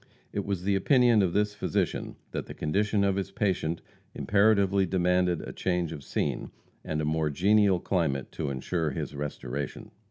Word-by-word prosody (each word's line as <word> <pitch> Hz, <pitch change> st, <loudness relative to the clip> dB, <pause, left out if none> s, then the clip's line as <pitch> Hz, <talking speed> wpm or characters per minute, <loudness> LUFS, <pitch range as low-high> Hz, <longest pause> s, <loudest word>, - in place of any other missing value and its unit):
It 100 Hz, -, -2 dB
was 100 Hz, -3 st, -2 dB
the 100 Hz, +1 st, +2 dB
opinion 120 Hz, +2 st, +4 dB
of 90 Hz, -3 st, +1 dB
this 105 Hz, 0 st, +1 dB
physician -, -, -2 dB, 0.2 s
that -, -, -4 dB
the -, -, -8 dB
condition 100 Hz, +6 st, +1 dB
of 100 Hz, -1 st, +2 dB
his 95 Hz, 0 st, -2 dB
patient 95 Hz, -5 st, -1 dB, 0.3 s
imperatively 100 Hz, -2 st, +3 dB
demanded 90 Hz, -1 st, +2 dB
a -, -, -7 dB
change 90 Hz, -3 st, -1 dB
of 75 Hz, -4 st, -7 dB
scene, -, -, -2 dB, 0.3 s
and 75 Hz, 0 st, -2 dB
a -, -, -1 dB
more 80 Hz, 0 st, +1 dB
genial 100 Hz, +4 st, +3 dB
climate 80 Hz, -8 st, -1 dB
to 75 Hz, -, -3 dB
insure 75 Hz, +5 st, -1 dB
his 65 Hz, -, -4 dB
restoration. 70 Hz, -1 st, -5 dB
90 Hz, 165 wpm, -28 LUFS, 80-100 Hz, 0.3 s, opinion